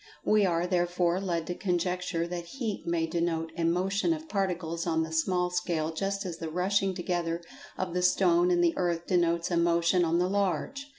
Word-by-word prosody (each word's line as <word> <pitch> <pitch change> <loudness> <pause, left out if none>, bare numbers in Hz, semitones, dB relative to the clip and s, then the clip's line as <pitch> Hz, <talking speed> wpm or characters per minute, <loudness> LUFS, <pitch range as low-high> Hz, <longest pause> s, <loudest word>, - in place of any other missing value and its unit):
We 210 -2 +4
are, 170 0 +1
therefore, 175 0 +1
led 170 -4 -1
to 175 - -3
conjecture 180 -2 -1
that 175 0 -5
heat 220 -9 -3
may 170 -1 +1
denote 165 -1 -1
a 170 - -2
motion 195 - +1
of 320 0 -7
particles 180 - -2
on 160 -1 +1
the 160 - -6
small 180 +2 +1
scale 170 -3 -1
just 195 +4 -2
as 175 -3 -5
the 165 - -4
rushing 190 +3 +1
together 175 -1 -2 0.3
of 185 -2 -3
the 180 - 0
stone 180 -1 +4
and 175 -1 +3
the 170 -1 +2
earth 175 -2 -1
denotes 170 -1 +1
a 170 - +2
motion 170 +1 +3
on 165 0 +2
the 180 +1 +2
large. 200 +8 -1
175 Hz, 190 wpm, -29 LUFS, 170-185 Hz, 0.3 s, We